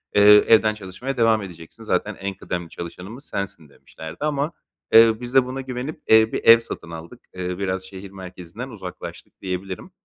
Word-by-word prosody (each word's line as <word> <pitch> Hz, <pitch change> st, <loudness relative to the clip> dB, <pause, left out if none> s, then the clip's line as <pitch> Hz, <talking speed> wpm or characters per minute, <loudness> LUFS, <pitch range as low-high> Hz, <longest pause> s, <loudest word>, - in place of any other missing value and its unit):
eee, 105 Hz, -, +6 dB, 0.3 s
evden 110 Hz, -1 st, +5 dB
çalışmaya 110 Hz, +7 st, -6 dB
devam 115 Hz, -2 st, +3 dB
edeceksin 85 Hz, +3 st, -11 dB
zaten 105 Hz, 0 st, -1 dB
en 100 Hz, +1 st, -4 dB
kıdemli 90 Hz, -2 st, -5 dB
çalışanımız 95 Hz, -, -9 dB
sensin." 90 Hz, -6 st, -5 dB
demişlerdi 80 Hz, +3 st, -11 dB
ama, 150 Hz, +1 st, -1 dB, 0.4 s
eee, 115 Hz, 0 st, +8 dB
biz 120 Hz, +1 st, -7 dB
de 135 Hz, -1 st, +5 dB
buna 130 Hz, +1 st, -5 dB
güvenip, 130 Hz, +3 st, -6 dB
eee, 110 Hz, 0 st, +6 dB
bir -, -, -2 dB
ev 115 Hz, 0 st, +9 dB
satın 85 Hz, -7 st, -8 dB
aldık. 80 Hz, 0 st, -9 dB
Eee, 90 Hz, -1 st, -4 dB
biraz 95 Hz, -1 st, -2 dB
şehir 95 Hz, +1 st, -10 dB
merkezinden 95 Hz, +5 st, -9 dB
uzaklaştık 95 Hz, -7 st, -9 dB
diyebilirim. 95 Hz, -, -5 dB
100 Hz, 165 wpm, -23 LUFS, 90-115 Hz, 0.4 s, ev